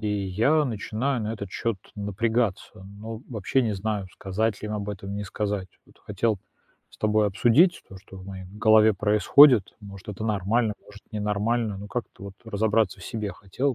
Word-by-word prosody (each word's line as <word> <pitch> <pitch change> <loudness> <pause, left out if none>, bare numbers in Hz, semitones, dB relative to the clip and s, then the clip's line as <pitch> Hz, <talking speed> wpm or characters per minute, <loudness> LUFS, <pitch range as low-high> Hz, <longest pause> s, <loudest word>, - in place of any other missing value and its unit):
И 110 - -3
я 105 +10 +2
начинаю 120 +2 -2
на 110 +1 -2
этот 100 -3 -6
счёт 115 +1 -2 0.2
напрягаться. 105 -1 -2 0.2
Но 110 0 -7
вообще 120 +3 0
не 110 -3 -1
знаю, 100 0 -2
сказать 105 +2 -2
ли - - -3
им 105 - -3
об 105 0 -4
этом- 100 0 -6
не 105 - -4
сказать. 100 -1 -3 0.2
Вот - - -23
хотел 105 0 -1 0.5
с - - -18
тобой 110 0 +2
обсудить 120 - +3
то, 95 - -11
что 95 0 -14
в 95 - -10
моей 95 -1 -8
голове 110 +2 +4
происходит. 105 +3 +5
Может, 100 -1 -11
это 105 +1 -5
нормально, 110 +2 +1
может, 105 -1 -14
ненормально. 105 +1 -1
Ну, 100 - -8
как-то, 110 -4 -6
вот, 100 -1 -8
разобраться 110 -2 +1
в - - -10
себе 105 -3 -4
хотел, 120 +8 -2
105 Hz, 180 wpm, -25 LUFS, 100-115 Hz, 0.5 s, происходит